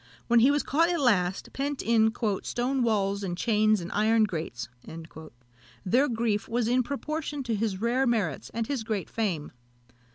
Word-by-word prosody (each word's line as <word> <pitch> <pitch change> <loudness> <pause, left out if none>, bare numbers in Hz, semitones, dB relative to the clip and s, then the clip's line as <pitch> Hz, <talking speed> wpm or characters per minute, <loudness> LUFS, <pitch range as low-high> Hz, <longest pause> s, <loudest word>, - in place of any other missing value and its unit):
When 235 0 +4
he 245 +4 +6
was 290 0 +2
caught 330 +4 +2
at 345 -1 0
last, 195 -9 +1
pent 280 +1 -2
in 220 -1 +3 0.3
"stone 255 +2 -1
walls 200 -4 +1
and 175 -2 -3
chains 215 -1 +2
and 170 - -6
iron 220 +1 +3
grates," 160 - -3 1.2
their 250 +10 +3
grief 225 -3 -1
was 235 -1 0
in 250 +2 +3
proportion 290 +2 -4
to 235 -2 -2
his 210 -3 -1
rare 245 +4 +1
merits 205 - -1
and 230 0 -2
his 265 -2 -3
great 215 -6 -3
fame. 185 -10 -2
225 Hz, 165 wpm, -27 LUFS, 205-255 Hz, 1.2 s, he